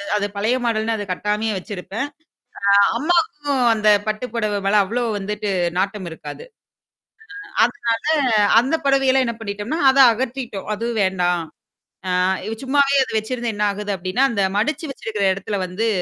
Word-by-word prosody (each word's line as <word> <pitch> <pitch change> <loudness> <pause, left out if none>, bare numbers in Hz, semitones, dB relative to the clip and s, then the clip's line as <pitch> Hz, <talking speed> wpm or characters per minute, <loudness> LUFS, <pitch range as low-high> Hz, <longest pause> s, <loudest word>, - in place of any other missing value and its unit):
அது 205 - 0
பழைய 220 +5 +1
மாடல்ன்னு 225 0 0
அ 205 -3 -6
கட்டாமையா 210 +3 -1
வச்சிருப்பேன். 205 +6 -5 0.7
அ - - +7 0.2
அம்மாக்கும் 295 - 0
அந்த 215 -1 -1 0.2
பட்டு 215 +3 -2
புடவ 210 -3 -1
மல 210 +1 +4
அவ்வளோ 240 +5 -2
வந்துட்டு 205 +1 -4 0.3
நாட்டம் 195 -2 -2
இருக்காது. 315 - -9 1.0
ஆ - - -16 0.2
அதனால 230 -1 -3 0.5
அந்த 270 +6 -1
புடவையெல்லாம் 270 -1 +3
என்ன 235 - -3
பண்ணிட்டோம்னா, 210 +9 -4
அத 270 - +1
அகற்றிட்டோம். 240 -4 -4
அதுவும் 230 0 -2
வேண்டாம். 180 -2 0 0.7
ஆ - - +1 0.5
சும்மாவே 280 +1 +3
அ - - -16
வச்சிருந்து 235 +1 -3
என்ன 210 0 -1
ஆகுது 205 +1 -5
அப்டின்னா, 185 +9 0
அந்த 200 -3 0 0.2
மடிச்சு 305 +8 -1
வச்சிருக்கிற 215 -5 -3
இடத்துல 200 +1 -4
வந்து, 195 +6 -2
220 Hz, 140 wpm, -21 LUFS, 205-255 Hz, 1.0 s, அ